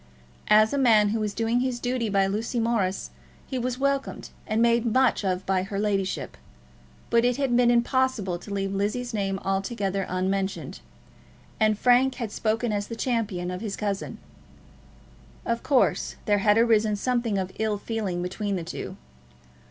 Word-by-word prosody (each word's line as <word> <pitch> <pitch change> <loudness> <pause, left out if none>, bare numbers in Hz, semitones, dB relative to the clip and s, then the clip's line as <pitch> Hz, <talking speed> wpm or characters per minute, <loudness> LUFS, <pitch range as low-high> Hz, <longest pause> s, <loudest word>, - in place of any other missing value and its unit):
As 215 +2 +5
a 280 - +1
man 220 -5 +5
who 220 +2 -1
was 210 -1 -2
doing 230 +1 +1
his 250 -1 -1
duty 245 -2 -1
by 195 -1 +3
Lucy 220 +5 -2
Morris, 225 -5 0 0.3
he 260 - -3
was 250 0 -2
welcomed 275 0 -2 0.2
and 215 +1 0
made 235 0 +3
much 245 0 +2
of 185 -1 -1
by 190 -1 +1
her 195 +1 -5
ladyship; 195 -2 -1 0.7
but 235 0 +4
it 245 0 +2
had 270 -4 +1
been 245 -1 +4
impossible 240 -6 +1
to 205 - -11
leave 195 -1 -2
Lizzie's 220 +5 -2
name 195 -2 -1
altogether 195 0 -1
unmentioned, 190 +1 -2 0.8
and 215 -1 +3
Frank 250 +3 +4
had 230 -5 -4
spoken 225 +2 -1
as 205 -1 -2
the 230 - -6
champion 215 -8 -2
of 180 +1 -5
his 210 -3 -3
cousin. 200 -2 -3 1.3
Of 235 0 -1
course 270 -3 +1
there 205 -1 +3
had 210 +1 +4
arisen 220 -2 +3
something 235 -1 0
of 190 -1 -2
ill 215 -1 0
feeling 200 -5 -3
between 200 +2 -2
the 175 - -3
two. - - -6
215 Hz, 165 wpm, -26 LUFS, 195-240 Hz, 1.3 s, As